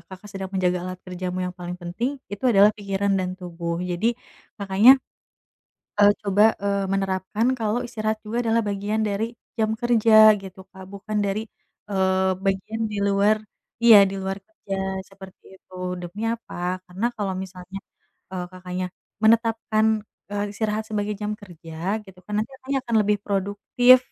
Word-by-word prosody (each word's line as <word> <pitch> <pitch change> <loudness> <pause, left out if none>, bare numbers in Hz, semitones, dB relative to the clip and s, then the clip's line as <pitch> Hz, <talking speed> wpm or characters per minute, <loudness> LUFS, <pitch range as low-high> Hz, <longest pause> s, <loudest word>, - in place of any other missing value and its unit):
Kakak, 190 +4 -13
sedang 195 -1 -5
menjaga 180 -2 0
alat 185 0 -6
kerjamu 185 0 -4
yang 180 - -3
paling 180 -1 -6
penting 195 +11 -3 0.2
itu 205 +4 -6
adalah 205 -2 +6
pikiran 200 -1 -1
dan 185 0 -3
tubuh 170 -2 -4
jadi, 190 +7 0 0.4
Kakaknya, 205 +6 +6 1.1
eee, 205 0 +8
coba, 210 +2 +4
eee, 200 0 0
menerapkan 195 +3 0
kalau 225 +1 0
istirahat 215 -2 -2
juga 235 +3 -1
adalah 230 0 +3
bagian 205 +2 -1
dari 220 +3 -2 0.2
jam 220 0 +1
kerja 220 -2 +6
gitu 190 -1 -11
Kak, 190 -1 -11
bukan 205 +2 -4
dari, 205 +2 -1 0.4
eee, 190 -1 +2
bagian 195 +3 -1
di 210 - -4
luar 200 +2 +3 0.4
iya 220 -4 +9
di 190 - -4
luar 190 0 -3
kerja 200 -10 -7 0.3
seperti 190 -1 -14
itu, 185 - -20 0.2
demi 175 +4 -7
apa 185 -5 -3
karena 190 +6 -2
kalau 195 -3 -2
misalnya, 185 0 -7 0.5
eee, 180 -1 -3
Kakaknya, 185 0 -5 0.4
menetapkan, 220 -1 +3 0.3
eee, 205 0 -1
istirahat 215 0 -1
sebagai 210 -1 -2
jam 210 0 -2
kerja 175 +1 -5
gitu 190 -1 -15
kan 210 +1 -2
nanti 225 - -8
Kakaknya, 270 +1 -2
akan 235 - -1
lebih 210 0 +1
produktif 205 +6 +4
200 Hz, 150 wpm, -24 LUFS, 185-215 Hz, 1.1 s, iya